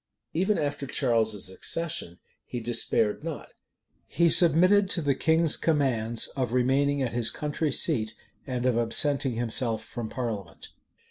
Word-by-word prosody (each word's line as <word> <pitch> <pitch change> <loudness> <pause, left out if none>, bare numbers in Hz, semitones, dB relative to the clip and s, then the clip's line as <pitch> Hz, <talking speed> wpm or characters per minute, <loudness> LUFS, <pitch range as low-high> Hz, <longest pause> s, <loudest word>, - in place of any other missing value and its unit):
Even 190 +5 +1
after 145 -1 -3
Charles's 110 -8 0
accession 95 - -2 0.3
he 125 - -6
despaired 115 0 0
not. 165 -2 -7 0.6
He 170 -1 +2
submitted 185 +3 +5
to 175 - +1
the 140 -1 +2
king's 160 +2 +2
commands 120 -8 0
of 125 -3 -2
remaining 135 +3 +1
at 120 - -3
his 120 -2 +1
country 150 0 -3
seat, 115 -8 0 0.3
and 125 -2 -3
of 125 -2 +2
absenting 135 +3 +2
himself 115 -1 -1
from 115 -2 -6
parliament. 105 -9 -6
130 Hz, 135 wpm, -26 LUFS, 115-155 Hz, 0.6 s, submitted